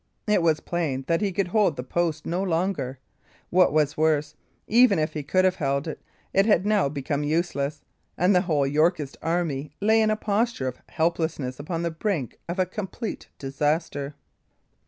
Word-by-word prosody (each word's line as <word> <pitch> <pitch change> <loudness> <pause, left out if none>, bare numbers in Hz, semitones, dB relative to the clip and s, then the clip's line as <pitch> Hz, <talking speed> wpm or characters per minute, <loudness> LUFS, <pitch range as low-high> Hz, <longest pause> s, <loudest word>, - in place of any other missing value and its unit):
It 210 -4 +3
was 160 -2 +2
plain 155 -7 -2
that 165 +3 +1
he 200 -2 +1
could 185 0 -1
hold 205 -5 +3
the 125 - -5
post 160 +2 -1
no 175 +3 -1
longer; 165 -7 -1 0.5
what 180 +1 +5
was 150 0 +2
worse, 155 -2 +1 0.3
even 245 0 +5
if 155 0 0
he 150 - -3
could 185 +6 +2
have 185 0 +2
held 140 +1 -1
it, 160 - -6 0.3
it 195 +2 +4
had 200 -4 +4
now 205 -8 +3
become 145 +1 -2
useless; 150 -2 -1 0.3
and 180 +4 +4
the 180 - +5
whole 155 -7 +1
Yorkist 150 0 +1
army 155 -4 -1
lay 220 +2 +4
in 215 - +3
a 215 - +2
posture 215 - 0
of 125 -1 -5
helplessness 160 -5 -1
upon 165 +3 -3
the 170 - -1
brink 160 - -2
of 175 - -3
a 185 - +3
complete 205 +4 -5
disaster. 145 +1 -1
165 Hz, 180 wpm, -25 LUFS, 145-185 Hz, 0.5 s, what